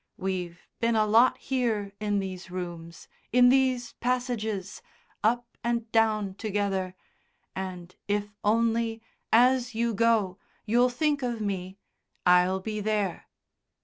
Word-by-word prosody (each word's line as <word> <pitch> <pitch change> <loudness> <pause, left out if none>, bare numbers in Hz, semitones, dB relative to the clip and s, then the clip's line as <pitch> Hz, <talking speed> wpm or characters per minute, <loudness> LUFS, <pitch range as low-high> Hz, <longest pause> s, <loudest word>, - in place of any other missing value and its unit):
We've 180 -2 -4
been 230 0 +1
a 215 -1 +3
lot 230 +4 +5
here 225 -6 -1
in 205 -1 0
these 190 -2 -5
rooms, 170 -2 -7 0.2
in 245 +1 +6
these 255 -2 +2
passages, 225 -5 -2 0.4
up 235 +2 0
and 235 -1 -1
down 215 -3 +2
together, 195 -3 -2 0.6
and 180 -2 -6
if 205 0 -1
only, 225 +1 +1 0.3
as 250 0 +4
you 230 0 0
go, 215 -4 +2 0.3
you'll 240 +3 +3
think 290 +3 0
of 240 -3 -2
me, 190 -2 -3 0.5
I'll 180 +1 +4
be 215 +2 -4
there.... 210 -3 -1
215 Hz, 120 wpm, -27 LUFS, 190-235 Hz, 0.6 s, in